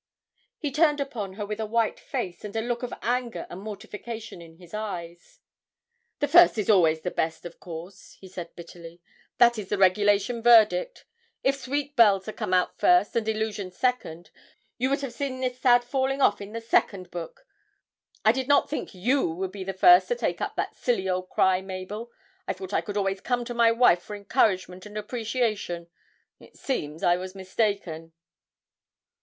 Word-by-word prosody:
He 295 -3 -3
turned 300 +1 +3
upon 230 -9 -4
her 205 +1 -5
with 210 +1 -5
a 220 - -1
white 230 +1 0
face 180 -2 -5
and 210 0 -7
a 225 - 0
look 240 +1 -3
of 250 - -4
anger 245 0 -2
and 175 - -7
mortification 215 0 -8
in 165 -1 -14
his 175 0 -17
eyes. 175 -5 -7 0.8
'The 290 - 0
first 345 -2 +6
is 210 0 +2
always 160 -5 +4
the 180 - -3
best, 160 +1 -2
of 170 - -9
course,' 175 +3 -10
he 190 - -12
said 180 -2 -9
bitterly; 170 0 -11 0.4
'that 235 -1 +5
is 195 -2 -7
the 205 - 0
regulation 205 +4 +3
verdict. 240 - +4 0.4
If 275 - +2
"Sweet 285 +2 -3
Bells" 200 -5 +5
had 215 - -7
come 205 -5 -1 0.2
first, 180 +3 +4
and 225 -1 0
"Illusion" 215 -3 -2
second, 180 -5 -2 0.5
you 255 +2 +1
would 275 +1 0
have 270 -4 -5
seen 260 0 -4
this 255 -1 -3
sad 245 -2 +5
falling 265 +2 -1
off 205 -6 +3
in 200 +1 -8
the 230 - -4
second 195 -5 0
book. 170 -2 -8 0.8
I 220 - +7
did 260 +2 -3
not 285 0 +3
think 295 - -4
you 245 +5 +1
would 185 +3 -4
be 195 -1 -7
the 195 - -3
first 355 - +6
to 485 - 0
take - - -2
up - - -3
that - - -3
silly 235 -6 -1
old 185 0 -2
cry, 190 0 +2
Mabel 195 +5 -7 0.4
I - - 0
thought 190 +1 -9
I - - +2
could 205 -1 -5
always 195 -1 -1
come 245 -1 -1
to 240 - -5
my 235 -1 +4
wife 230 -7 +4
for 210 - -8
encouragement 200 -3 0
and 210 0 -9
appreciation; 215 -6 -2 0.5
it - - -18
seems 155 - -4
I 175 0 +4
was 185 +1 -7
mistaken!' 190 -4 -2
210 Hz, 185 wpm, -26 LUFS, 185-240 Hz, 0.8 s, I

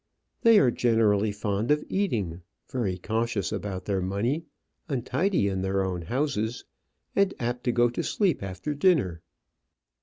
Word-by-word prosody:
They 230 -2 +7
are 130 -10 +5
generally 110 -3 +2
fond 105 +2 -2
of 150 0 +3
eating, 105 - -1 0.3
very 105 -8 -2
cautious 110 +1 -1
about 95 -2 -4
their 100 -2 0
money, 115 - -1 0.4
untidy 135 - +1
in 95 -1 -1
their 95 0 0
own 90 -2 -2
houses, 120 - -2 0.5
and 200 -1 +2
apt 120 0 -3
to 120 - +3
go 120 0 +4
to - - -2
sleep 190 -8 +1
after 100 +10 -4
dinner." 140 - +2
115 Hz, 145 wpm, -27 LUFS, 100-140 Hz, 0.5 s, They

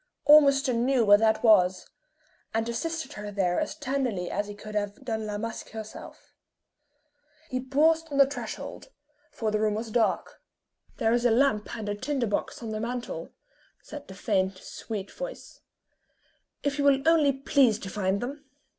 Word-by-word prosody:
Ormiston 275 -5 +5
knew 255 -2 +2
where 205 0 +7
that 220 0 +2
was, 190 -5 +4 0.7
and 225 0 0
assisted 300 +4 -3
her 210 -5 -6
there 190 -3 0
as 305 -1 -3
tenderly 260 - -2
as 205 - -2
he 205 - -8
could 215 +1 -10
have 205 -1 -2
done 220 -3 -3
La 205 0 -3
Masque 230 +2 -5
herself. 220 0 -10 1.2
He 255 - -1
paused 310 +5 +2
on 280 - -3
the 275 - +8
threshold; 280 - -7 0.4
for 220 -6 -3
the 215 - 0
room 215 -1 +1
was 220 +1 -4
dark. 225 -1 0 0.6
"There 225 +1 +2
is 240 0 +1
a 245 - +4
lamp 225 -3 +2
and 215 -2 -6
a 205 - -1
tinder 260 +4 -2
box 210 +3 -3
on 225 - -4
the 215 - -3
mantel," 240 +2 -4 0.5
said 290 -1 -9
the 190 - -10
faint, 190 -2 0
sweet 200 +1 -7
voice, - - -8 1.0
"if 285 0 -1
you - - +2
will 275 +1 +3
only 315 -4 +5
please 270 -4 +3
to 195 - -7
find 200 -1 -1
them." 280 +4 -5
230 Hz, 170 wpm, -27 LUFS, 210-275 Hz, 1.2 s, the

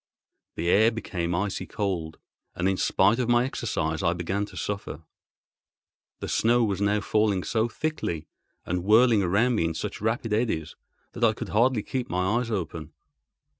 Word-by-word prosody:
The 85 - -3
air 110 +5 +5
became 90 -7 -3
icy 100 +2 -2
cold, 90 -7 -3 0.4
and 90 +1 0
in 95 - +2
spite 100 +5 +3
of 120 -2 0
my 120 +1 +4
exercise 80 - -2
I 85 -2 +2
began 95 +4 -2
to - - -13
suffer. 100 -6 -4 1.2
The - - -3
snow 120 +1 +3
was 100 -3 -1
now 105 +1 +2
falling 105 -2 +1
so 115 0 0
thickly 110 - -3 0.4
and 90 0 -2
whirling 110 +2 +5
around 100 +7 +2
me 95 -8 +1
in 80 -1 -2
such - - -5
rapid 110 0 -1
eddies 105 -9 -1 0.4
that 120 - -5
I 110 -1 +5
could - - -6
hardly 115 +1 +2
keep 130 -2 -3
my 90 +6 +1
eyes 125 -2 -3
open. 80 -6 -4
105 Hz, 170 wpm, -26 LUFS, 90-115 Hz, 1.2 s, air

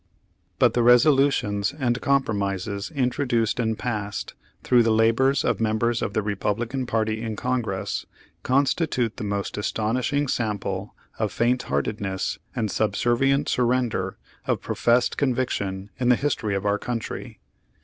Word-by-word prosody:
But - - +4
the 120 - +2
resolutions 125 -4 +4
and 120 -4 0
compromises 100 -6 0
introduced 125 -5 0
and 110 -2 0
passed, 105 -4 -4 0.3
through 125 -1 +5
the 115 - +2
labors 115 +5 +3
of - - +1
members 115 +2 +1
of 100 - -2
the 110 - 0
Republican 115 +5 -2
party 110 -1 0
in 110 -2 -3
Congress, 125 0 -2 0.3
constitute 130 -3 +1
the - - -5
most 100 0 -3
astonishing 125 +7 0
sample 100 -5 -2 0.2
of 110 -3 0
faintheartedness 100 - -1 0.2
and 110 -3 -1
sub 105 -3 0
servient 135 +6 +2
surrender 120 -6 0 0.3
of - - +1
professed 120 +1 +1
conviction 105 -8 -1
in 125 -1 +2
the 125 - +6
history 115 -7 -1
of 95 +1 -3
our 100 0 +1
country. 115 -2 -5
115 Hz, 130 wpm, -24 LUFS, 105-125 Hz, 0.3 s, the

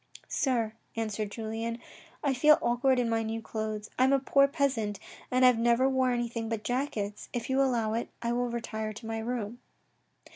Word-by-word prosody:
" - - -17
Sir," 235 -5 0 0.2
answered 215 -2 -2
Julien, 225 +1 -4 0.2
" - - -25
I 280 -2 +2
feel 300 +4 +6
awkward 255 +2 +2
in 245 -1 +2
my 225 0 +1
new 225 0 -3
clothes. 215 -1 -4
I - - +6
am 265 - +4
a - - +6
poor 275 +1 +4
peasant 265 -9 0 0.3
and 255 0 +4
have 250 -2 +6
never 240 +2 +4
wore 260 -1 +2
anything 235 -2 -2
but 225 -2 -3
jackets. 230 -5 -2
If 240 +1 -3
you 265 +1 +3
allow 235 -5 +1
it, 230 - -2
I 235 0 -1
will 245 0 0
retire 220 -2 -4
to 225 +2 -10
my 225 0 -3
room." 235 0 -3
235 Hz, 195 wpm, -29 LUFS, 220-255 Hz, 0.3 s, feel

